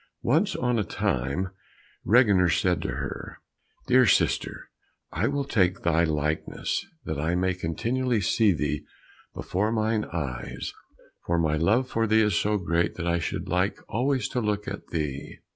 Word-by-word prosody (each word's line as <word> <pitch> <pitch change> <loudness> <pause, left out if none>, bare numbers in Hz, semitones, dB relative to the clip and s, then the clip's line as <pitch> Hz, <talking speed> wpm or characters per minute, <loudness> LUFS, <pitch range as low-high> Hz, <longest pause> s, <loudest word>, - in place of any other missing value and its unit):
Once 170 - +2
on 125 -2 +1
a - - +1
time 75 +2 -1 0.5
Reginer 100 -6 +5
said 90 0 +1
to - - -3
her, - - -6 0.5
"Dear 130 -1 +5
sister, - - +1 0.4
I - - 0
will 140 0 0
take 95 -9 +1
thy 85 0 +3
likeness, 75 - -1 0.2
that 80 -2 -3
I 80 +3 0
may 95 +1 +1
continually 115 +8 -1
see 105 +2 +3
thee 75 -3 -1 0.5
before 105 +4 -1
mine 110 -1 0
eyes, 70 -8 -5 0.5
for 85 - +1
my 80 -2 +2
love 105 +11 +2
for 115 -2 0
thee 110 +1 +4
is 105 -4 +1
so 105 +4 +1
great 85 -2 0
that 85 - -4
I 85 0 +2
should 90 +2 -3
like 90 +2 0
always 130 +2 0
to 125 - -1
look 105 -1 -1
at - - -6
thee." 75 -4 -4
95 Hz, 160 wpm, -26 LUFS, 85-115 Hz, 0.5 s, Reginer